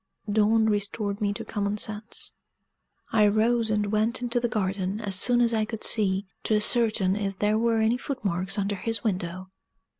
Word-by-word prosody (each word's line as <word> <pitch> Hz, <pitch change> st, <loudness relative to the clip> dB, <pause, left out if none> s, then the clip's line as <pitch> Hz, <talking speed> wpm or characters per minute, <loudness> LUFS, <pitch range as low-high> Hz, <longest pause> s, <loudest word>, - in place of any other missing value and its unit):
Dawn 215 Hz, +1 st, +3 dB
restored 205 Hz, 0 st, -1 dB
me 205 Hz, -1 st, +1 dB
to -, -, -7 dB
common 205 Hz, -1 st, -2 dB
sense. 215 Hz, +1 st, -2 dB, 0.8 s
I 210 Hz, -2 st, +4 dB
rose, 225 Hz, +2 st, +2 dB
and 210 Hz, -1 st, +1 dB
went 220 Hz, +3 st, +1 dB
into 240 Hz, 0 st, 0 dB
the 240 Hz, -, 0 dB
garden, 195 Hz, -1 st, -2 dB
as 205 Hz, -3 st, -3 dB
soon 240 Hz, +5 st, +3 dB
as 235 Hz, -1 st, +3 dB
I 220 Hz, -1 st, +1 dB
could 220 Hz, 0 st, -5 dB
see, 200 Hz, -2 st, +2 dB, 0.2 s
to 215 Hz, -, +2 dB
ascertain 210 Hz, -3 st, +3 dB
if 200 Hz, -2 st, -3 dB
there 210 Hz, +2 st, +1 dB
were 230 Hz, -1 st, +1 dB
any 225 Hz, +2 st, +2 dB
foot 265 Hz, -2 st, -6 dB
marks 185 Hz, +1 st, 0 dB
under 200 Hz, 0 st, -1 dB
his 225 Hz, +3 st, -2 dB
window. 185 Hz, -3 st, -3 dB
210 Hz, 180 wpm, -26 LUFS, 200-225 Hz, 0.8 s, I